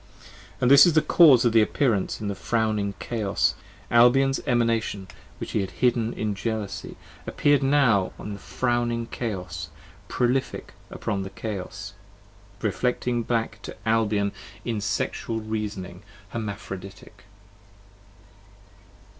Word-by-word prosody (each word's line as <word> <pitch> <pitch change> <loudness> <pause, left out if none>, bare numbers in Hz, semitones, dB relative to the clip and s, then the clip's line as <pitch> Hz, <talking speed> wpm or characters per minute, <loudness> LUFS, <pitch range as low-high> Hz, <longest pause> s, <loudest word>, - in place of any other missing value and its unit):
25 - - -25
And 125 +1 +4
this 140 - +10
is 170 - +3
the 155 - +4
cause 140 -9 +6
of 120 - +4
the 115 - +6
appearance 110 -3 0
in 105 - -4
the 100 - -1
frowning 105 -1 -1
Chaos: 100 - 0 0.4
Albion's 135 +3 +5
Emanation 115 -5 0 0.3
which - - -6
he - - +1
had 95 - -3
hidden 115 +4 +1
in 105 -1 -2
Jealousy 105 -1 -4 0.3
Appear'd 145 -1 +2
now 135 -9 +3
in 105 - -6
the 100 - -8
frowning 120 -1 -1
Chaos, 90 -11 -5 0.4
prolific 125 +2 -1 0.2
upon 100 -3 -3
the 95 - -5
Chaos, 100 -2 -6 0.7
Reflecting 125 -1 0
back 115 -2 -2
to - - -9
Albion 105 -3 +2 0.3
in 115 -3 -2
Sexual 110 +2 -2
Reasoning, 105 -4 -5 0.3
Hermaphroditic. 100 -3 -7
110 Hz, 120 wpm, -25 LUFS, 100-120 Hz, 0.7 s, this